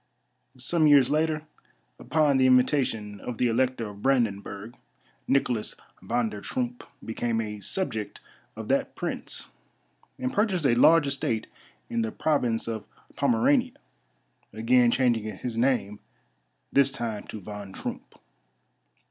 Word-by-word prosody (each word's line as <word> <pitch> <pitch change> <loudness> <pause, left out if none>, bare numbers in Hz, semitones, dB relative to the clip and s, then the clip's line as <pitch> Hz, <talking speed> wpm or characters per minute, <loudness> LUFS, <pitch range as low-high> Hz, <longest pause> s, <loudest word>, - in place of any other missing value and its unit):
Some 155 +5 +2
years 140 -3 +6
later, 155 0 +1 0.6
upon 150 -3 +2
the 130 0 +4
invitation 125 -5 +2
of 120 - -5
the 125 - +1
Elector 120 0 0
of 100 0 -10
Brandenburg, 110 -3 -1 0.5
Niklas 125 -5 +1 0.3
Van 120 -1 0
der 105 -1 -8
Troomp 120 +1 -3 0.2
became 115 0 -1
a 105 -2 -4
subject 110 - -3 0.4
of - - -7
that - - 0
prince, - - -4 0.7
and 125 - -3
purchased 195 -7 +1
a 130 - +5
large 155 +6 +6
estate 135 -5 -1 0.4
in 115 - -1
the 110 -1 -2
province 125 -8 0
of 110 -2 -4 0.3
Pomerania, 250 +1 +2 0.8
again 120 +3 +3
changing 115 -5 +1
his 120 +2 -5
name, 115 -4 +1 0.7
this 140 -1 +5
time 115 -6 -4
to 110 - -7
Von 105 0 -8
Troomp. - - -7
125 Hz, 125 wpm, -27 LUFS, 110-140 Hz, 0.8 s, years